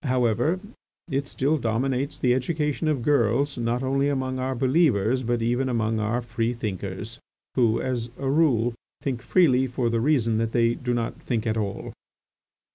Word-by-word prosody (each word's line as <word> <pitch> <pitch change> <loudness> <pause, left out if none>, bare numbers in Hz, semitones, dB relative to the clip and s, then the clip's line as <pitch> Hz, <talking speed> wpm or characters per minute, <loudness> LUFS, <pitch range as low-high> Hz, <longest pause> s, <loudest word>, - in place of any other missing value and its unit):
However, 125 - +1 0.5
it 135 +1 -1
still 145 +4 0
dominates 130 +4 -1
the 125 -1 +2
education 150 +4 -1
of 145 -6 0
girls 140 +1 +2
not 120 +1 -1
only 135 +2 +1
among 130 -2 -2
our 130 +1 -1
believers, 130 - +2
but 120 -1 -1
even 120 +3 +1
among 110 -2 0
our 110 +3 -1
free 120 0 -2
thinkers, 110 +1 -5 0.3
who, 115 -3 +2
as 125 -2 -2
a 135 - -3
rule, 135 -6 +2 0.3
think 130 -4 -2
freely 130 -8 +3
for 120 -1 -1
the 115 -1 +1
reason 120 -5 +2
that 115 0 -1
they 115 -1 +3
do 125 0 -2
not 115 -1 -3
think 115 -4 -2
at 110 -1 0
all. 100 -3 -3
125 Hz, 165 wpm, -25 LUFS, 115-135 Hz, 0.5 s, freely